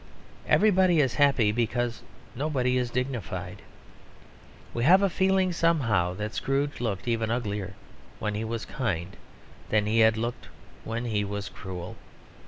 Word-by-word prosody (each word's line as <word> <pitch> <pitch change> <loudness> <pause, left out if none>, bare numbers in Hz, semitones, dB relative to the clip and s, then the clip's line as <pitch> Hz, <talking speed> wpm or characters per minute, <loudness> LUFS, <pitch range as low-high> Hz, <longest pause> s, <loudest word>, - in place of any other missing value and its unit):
Everybody 190 -5 +4
is 135 -5 +2
happy 140 -7 +3
because 120 +1 -1 0.3
nobody 130 -2 0
is 125 -1 0
dignified. 125 -3 -4 1.1
We 120 - -1
have 185 +8 +6
a 195 - +2
feeling 190 -1 +2
somehow 115 - +1
that 105 +3 -4
Scrooge 140 +1 -1
looked 110 -3 -3
even 115 -2 0
uglier 105 -5 -3 0.4
when 105 - -2
he 105 +2 -3
was 115 0 -4
kind 95 - -3 0.5
than 105 -1 +2
he 110 +2 +2
had 110 0 +5
looked 115 +2 -4 0.4
when 115 +2 -3
he 105 -3 0
was 100 0 -4
cruel. 90 -2 -8
115 Hz, 140 wpm, -27 LUFS, 105-140 Hz, 1.1 s, have